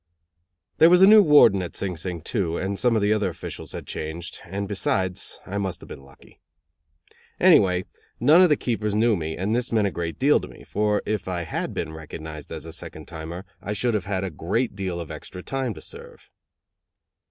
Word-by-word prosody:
There 165 - +8
was 180 +1 +6
a - - +11
new 215 +2 +9
warden 145 - +6
at 90 - -6
Sing 95 -2 -3
Sing, 85 0 -5
too, 85 -3 -1
and 95 +1 -2
some 120 -2 +3
of 110 - +1
the 105 +1 +3
other 105 -3 0
officials 85 -1 -8
had - - -6
changed; 80 +3 -6
and, 100 +3 -4
besides, 95 -2 -1
I 100 +1 -3
must 95 -3 -3
have - - -13
been - - -9
lucky. 70 0 -19 1.0
Anyway, 90 -1 +5 0.3
none 155 +8 +6
of 180 - +6
the 150 - +5
keepers 110 -5 -2
knew 110 +1 +3
me, 80 -3 -4
and 100 +5 0
this 125 0 -1
meant 110 -3 +2
a 100 - 0
great 85 -2 -4
deal 145 +3 +4
to - - -8
me; - - -14
for 105 0 0
if 105 -3 -2
I 90 -2 -2
had 80 - -4
been 80 -2 -3
recognized 80 -1 -9
as 80 -1 -6
a 80 - -8
second 80 - -7
timer 85 +3 -7 0.2
I 105 - -3
should 120 +3 0
have 105 -3 -1
had 100 -1 -2
a 95 - -3
great 100 - -1
deal 95 -3 -3
of 85 - -7
extra 90 - -9
time 130 -5 -3
to - - -10
serve. - - -11
95 Hz, 210 wpm, -24 LUFS, 85-110 Hz, 1.0 s, a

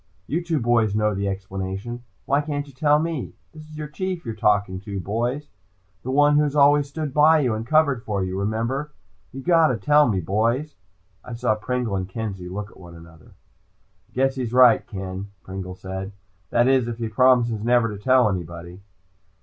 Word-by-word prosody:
"You 170 +3 -2
two 165 -3 -1
boys 115 -3 +2
know 105 0 +1
the 100 +1 -2
explanation. 95 +4 -5 0.2
Why 140 +1 +2
can't 145 -1 -3
you 140 - -16
tell 150 +2 +3
me? 160 -3 -3 0.2
This 155 -1 -12
is 155 - -11
your 150 -1 -5
Chief 180 +3 -4
who's 115 -3 -6
talking, 100 -3 +1 0.2
boys. 120 +9 -2 0.5
The 125 - -7
one 145 +2 +4
who - - +5
has 150 -1 -1
always 145 0 +4
stood 150 -1 -4
by 155 +1 +5
you 125 -5 +1
and 110 +1 -5
covered 145 -5 +2
for 100 -3 -2
you. 95 +1 -3
Remember? 115 +8 -2 0.4
You 135 - -8
just - - -18
gotta 165 -8 +4
tell 150 +3 +4
me, 100 -4 0
boys." 115 - -1 0.5
I 125 - -8
saw 120 -2 +1
Pringle 115 0 -2
and 95 -1 -3
Kenzie 95 -4 -5
look 105 +3 -6
at - - -18
one 85 -2 -12
another. 80 -2 -16 0.8
"I - - -31
guess 135 +1 +1
he's 125 -3 -4
right, 125 -2 +6
Ken," 95 -1 -6 0.2
Pringle 95 -1 -7
said. 95 +1 -6 0.4
"That 120 - +3
is, 130 -3 +3
if 120 -1 -4
he 115 -1 -3
promises 120 -1 +3
never 120 0 +3
to 100 - -12
tell 130 -2 +4
anybody." 85 -1 -5
120 Hz, 190 wpm, -23 LUFS, 100-145 Hz, 0.8 s, right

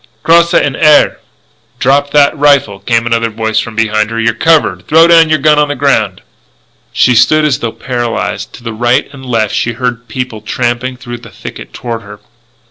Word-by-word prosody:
Crosse 170 +1 +3
en 145 - +1
air!_" 150 -1 +4 0.6
"Drop 140 +3 +1
that 145 0 +3
rifle!" 140 -9 +2
came 115 +1 0
another 115 0 0
voice 110 0 -2
from 115 0 -5
behind 110 -1 0
her. 115 0 -4
"You're 115 0 +1
covered! 165 +5 +1
Throw 165 +1 +5
your 165 -2 +4
gun 150 +1 +3
on 150 - +2
the 145 - -3
ground!" 110 -10 0 0.7
She 125 - +2
stood 155 +6 +3
as 140 -5 0
though 115 - -3
paralysed. 120 -2 -4
To - - -13
the 115 -1 -5
right 120 +5 0
and 135 -1 -12
left 115 -5 -1
she 115 - -1
heard 125 0 -4
people 125 -1 -5
trampling 120 +3 -3
through 120 -1 -8
the - - -13
thicket - - -10
toward 115 - -6
her. 105 -1 -12
120 Hz, 185 wpm, -11 LUFS, 115-145 Hz, 0.7 s, Throw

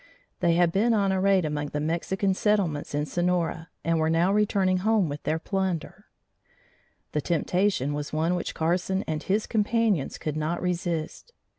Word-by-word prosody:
They 170 -2 +3
had 175 -1 +3
been 225 +5 +2
on 200 -2 +2
a 190 -1 0
raid 195 -3 +3
among 150 -1 -2
the 150 - -3
Mexican 175 +5 0
settlements 185 -9 0
in 145 0 0
Sonora 175 -1 -1
and 165 -1 +1
were 160 0 +2
now 170 +4 +2
returning 195 -3 +2
home 210 -3 +2
with 145 +1 -5
their 160 - 0
plunder. 180 -2 -3 1.1
The 150 - -1
temptation 175 -2 0
was 145 0 -4
one 160 +3 +1
which 180 - -3
Carson 180 +4 0
and 155 -1 -3
his 205 +5 0
companions 215 - +1
could 155 -1 -4
not 155 +3 -1
resist. 175 - -3
175 Hz, 165 wpm, -26 LUFS, 160-195 Hz, 1.1 s, They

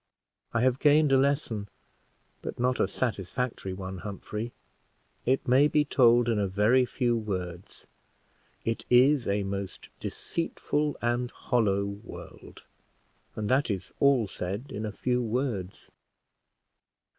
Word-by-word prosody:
I 115 - +1
have 130 +1 +2
gained 150 0 +5
a 135 - +6
lesson, 135 -7 0 0.7
but - - -5
not 125 +1 +1
a - - +3
satisfactory 115 -2 -2
one, 95 0 -6
Humphrey; 105 +3 -5 0.8
it 130 +2 +1
may 130 +4 +6
be 150 0 +2
told 120 -4 +5
in 115 -3 +1
a 100 - +1
very 105 +7 +3
few 120 -2 +1
words. 90 -5 -5 0.8
It 115 0 -1
is 130 +2 +5
a 100 0 +1
most 100 0 -5
deceitful 150 -3 -2
and 120 +1 0
hollow 105 -7 +1
world! 100 +3 -10 0.7
and 105 -1 -3
that 130 +1 +2
is 95 -3 -4
all 140 -5 +4
said 100 +6 -5
in 110 +1 -3
a - - -4
few 125 +4 0
words." 115 -5 -3
120 Hz, 130 wpm, -28 LUFS, 100-130 Hz, 0.8 s, a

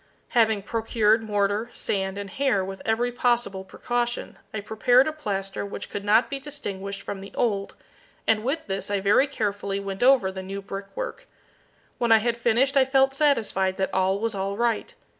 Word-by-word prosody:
Having 220 -4 +3
procured 220 0 +2
mortar, 205 +1 0
sand, 190 -1 -2
and 200 -1 -6
hair 250 -8 +1
with 195 0 -7
every 235 +2 +1
possible 240 -6 0
precaution, 240 +5 -3
I 215 - -4
prepared 245 +6 +3
a - - 0
plaster 195 -10 -4
which 200 - -7
could 200 - -4
not 220 +3 +4
be 275 - -4
distinguished 200 -9 -6
from 195 - -5
the 195 - -10
old, 200 -4 -1 0.5
and 215 -1 +2
with 285 +6 -2
this 195 0 -3
I 205 -1 +1
very 205 +8 +4
carefully 205 -6 -2
went 195 -1 -5
over 250 -7 +5
the 190 0 -6
new 195 +1 -6
brick 195 0 -6
work. - - -5 0.7
When 235 -1 +1
I 225 - +9
had 230 +2 0
finished 240 +4 +2
I 270 - +6
felt 270 0 +3
satisfied 220 -10 +1
that 190 - -1
all 190 +1 +2
was 225 +1 -1
all 195 0 -3
right. 235 -2 0
215 Hz, 180 wpm, -25 LUFS, 195-245 Hz, 0.7 s, I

